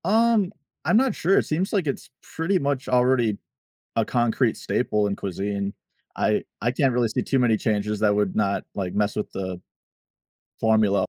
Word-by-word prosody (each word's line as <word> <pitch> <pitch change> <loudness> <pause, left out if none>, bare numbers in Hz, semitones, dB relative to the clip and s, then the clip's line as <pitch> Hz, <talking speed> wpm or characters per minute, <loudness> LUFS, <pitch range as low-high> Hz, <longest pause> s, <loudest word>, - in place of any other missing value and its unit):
Um, 220 -2 +3 0.3
I'm 220 - +4
not 260 -3 +2
sure, 190 +4 +2
it - - +3
seems 175 +5 -1
like 190 -7 +1
it's 140 - -3
pretty 175 +4 -1
much 140 -2 -1
already 125 -4 +3 0.6
a - - +2
concrete 120 -2 +1
staple 105 -1 0
in 100 - -2
cuisine. 100 +1 -3 0.4
I - - +1 0.2
I 120 - +1
can't 135 0 +1
really 120 -1 +2
see 125 - -1
too 135 +2 0
many 115 -3 +3
changes 105 -1 -1
that 105 -1 +3
would 105 -2 0
not, 100 -2 0
like, 95 -3 -3
mess 105 0 +1
with 105 - -3
the 95 -2 -4 1.0
formula. 110 -3 +3
115 Hz, 175 wpm, -24 LUFS, 105-140 Hz, 1.0 s, I'm